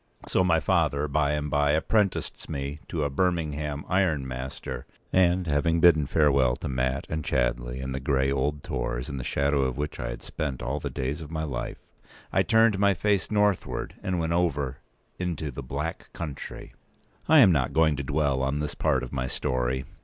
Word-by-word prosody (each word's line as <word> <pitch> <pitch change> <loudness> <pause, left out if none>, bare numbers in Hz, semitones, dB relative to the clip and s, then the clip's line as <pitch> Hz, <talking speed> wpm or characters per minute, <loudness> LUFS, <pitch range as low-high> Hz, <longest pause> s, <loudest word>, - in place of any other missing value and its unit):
So 95 - +2
my 85 -3 +3
father 75 -5 +1
by 75 0 +1
and 75 0 -1
by 75 0 +2
apprenticed 100 +5 0
me 70 +2 -4
to 80 -4 -2
a 70 - 0
Birmingham 75 -3 -1
iron 85 -8 +1
master; 65 0 -6 0.3
and, 90 0 +3
having 80 +2 +1
bidden 80 -4 +5
farewell 70 -5 +3
to - - -6
Mat, 65 +1 -1
and 80 0 -3
Chadleigh, 60 0 -1
and 65 0 -3
the 65 - -2
grey 70 0 +1
old 70 +2 -1
Tors 60 +1 -3
in 70 - -4
the 65 - -4
shadow 70 +2 +1
of 65 -2 -1
which 75 +1 -3
I - - -3
had - - -7
spent 70 -5 -4
all 70 +4 -2
the - - -4
days 70 +5 -3
of 75 - -8
my 80 -1 -3
life, 70 -6 -4 0.6
I - - +4
turned 110 -3 +4
my 100 -1 +4
face 100 +2 +1
northward, 105 -2 0
and 95 -1 -1
went 85 0 0
over 70 -6 0 0.4
into 85 -5 -2
"the 70 - -6
Black 70 +5 -5
Country." 75 -5 -7 0.5
p. - - -2
190I - - +9
am 95 - +6
not 70 -6 +1
going 80 -2 +3
to 70 - -3
dwell 70 -1 +1
on 70 +2 0
this 75 -1 -2
part - - +1
of 65 - -7
my 65 -2 -1
story. 65 +1 -1
75 Hz, 195 wpm, -27 LUFS, 65-85 Hz, 0.6 s, 190I